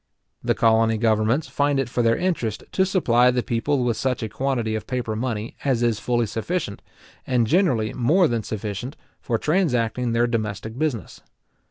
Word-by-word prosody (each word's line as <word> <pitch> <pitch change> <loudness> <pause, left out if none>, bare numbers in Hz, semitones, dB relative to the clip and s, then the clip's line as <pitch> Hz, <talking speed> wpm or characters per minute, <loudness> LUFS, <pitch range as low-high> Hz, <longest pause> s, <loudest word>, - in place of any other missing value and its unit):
The - - +1
colony 115 0 +3
governments 110 +5 +1
find 145 -1 +1
it 135 - 0
for 120 0 -1
their 115 -1 +3
interest 165 - -1
to 190 0 +2
supply 125 -10 +3
the 125 -1 0
people 125 +3 0
with 120 -2 0
such 130 -3 -1
a 110 - -3
quantity 125 -3 -1
of 110 -1 -4
paper 125 -4 -2
money 115 -1 -3
as 130 -4 +1
is 115 -3 +1
fully 120 0 0
sufficient, 115 - -3 0.5
and 125 -3 +2
generally 120 - +2
more 160 +9 +3
than 115 -3 -1
sufficient, 110 +5 -5 0.2
for 115 - -1
transacting 125 - 0
their 120 +1 +3
domestic 110 -2 -3
business. 135 - -3
120 Hz, 170 wpm, -23 LUFS, 110-135 Hz, 0.5 s, colony